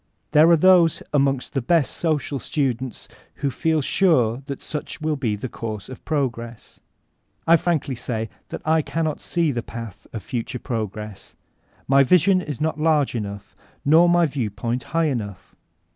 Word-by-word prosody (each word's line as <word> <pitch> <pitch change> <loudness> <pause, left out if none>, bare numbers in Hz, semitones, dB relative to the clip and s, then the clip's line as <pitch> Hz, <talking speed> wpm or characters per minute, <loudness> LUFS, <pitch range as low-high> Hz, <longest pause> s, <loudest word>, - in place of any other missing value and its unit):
There 155 +2 +6
are 170 - +6
those 175 -1 +5
aaxHug 135 -2 +1
tfie 135 -4 -3
best 165 -6 +2
social 150 -4 -1
students 130 -5 -2 0.3
who 140 -1 -2
feel 160 +4 +1
sure 130 - +2
that 140 -2 -5
such 150 +1 -5
will 155 -1 -1
be 120 -7 -1
the 105 +5 -5
course 110 -3 -6
of 130 - -10
progress* 120 -6 -3 0.7
I 165 - +7
frankly 160 -5 0
say 115 -2 -3 0.2
that - - -6
I 160 +1 +3
cannot 155 0 -2
see 170 -4 +1
the 120 -3 -2
path 115 -3 -9
of 110 - -6
future 125 -1 -4
p 125 - -6
rog 110 -3 -2
res 105 0 -5
s,— 95 - -14 0.5
my 140 +1 +6
vision 185 +6 +4
is 150 -7 -6
not 155 0 -1
large 155 -3 +2
enough, 100 -3 -6 0.3
nor 165 +4 +6
my 175 0 +4
view 135 -7 -2
point 115 +5 -3
high 165 0 0
enough. 105 -7 -5
140 Hz, 175 wpm, -23 LUFS, 115-160 Hz, 0.7 s, I